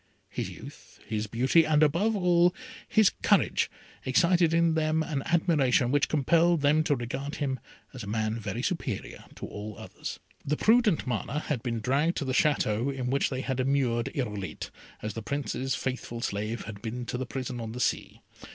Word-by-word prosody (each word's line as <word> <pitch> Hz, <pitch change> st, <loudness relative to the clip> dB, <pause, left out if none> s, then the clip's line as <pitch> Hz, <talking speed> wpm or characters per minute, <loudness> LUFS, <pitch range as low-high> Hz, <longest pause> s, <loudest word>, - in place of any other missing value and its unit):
His -, -, -3 dB
youth, -, -, -12 dB
his 110 Hz, 0 st, -2 dB
beauty, 130 Hz, +9 st, +4 dB
and, 155 Hz, -1 st, +3 dB
above 180 Hz, +9 st, +2 dB
all, 180 Hz, -1 st, +4 dB, 0.3 s
his 215 Hz, -3 st, +5 dB
courage, -, -, +3 dB, 0.3 s
excited 170 Hz, +4 st, +3 dB
in 165 Hz, 0 st, +3 dB
them 160 Hz, 0 st, +1 dB
an 150 Hz, -4 st, -2 dB
admiration 150 Hz, -8 st, +3 dB
which 145 Hz, 0 st, +2 dB
compelled 165 Hz, +3 st, +3 dB
them 150 Hz, +2 st, +4 dB
to 145 Hz, -, +3 dB
regard 130 Hz, +4 st, -4 dB
him 135 Hz, -3 st, -2 dB, 0.3 s
as 130 Hz, -, -7 dB
a 100 Hz, -, -7 dB
man 110 Hz, +1 st, 0 dB
very 115 Hz, +3 st, -4 dB
superior 140 Hz, -, -3 dB
to -, -, -6 dB
all 105 Hz, +1 st, -7 dB
others. -, -, -7 dB, 0.2 s
The 150 Hz, +2 st, -1 dB
prudent 225 Hz, -6 st, +4 dB
Mana 125 Hz, +2 st, -2 dB
had 145 Hz, -7 st, -2 dB
been 115 Hz, -2 st, -2 dB
dragged 140 Hz, +8 st, +1 dB
to 145 Hz, -, -2 dB
the 130 Hz, -, -1 dB
Château 130 Hz, -4 st, +2 dB
in 130 Hz, -2 st, -3 dB
which 140 Hz, -, +2 dB
they 130 Hz, -1 st, -3 dB
had 130 Hz, -1 st, -2 dB
immured 130 Hz, -3 st, +1 dB
Irolite, 105 Hz, -9 st, -4 dB, 0.3 s
as 105 Hz, -1 st, -3 dB
the 115 Hz, -, -5 dB
Prince's 135 Hz, +1 st, -2 dB
faithful 125 Hz, -2 st, -4 dB
slave 105 Hz, +1 st, -2 dB
had 100 Hz, -1 st, -8 dB
been 120 Hz, +2 st, -4 dB
to 120 Hz, -, -3 dB
the 130 Hz, -, -3 dB
prison 125 Hz, -2 st, -4 dB
on 110 Hz, -1 st, -5 dB
the 125 Hz, -, -6 dB
sea. -, -, -1 dB
135 Hz, 180 wpm, -28 LUFS, 115-155 Hz, 0.3 s, his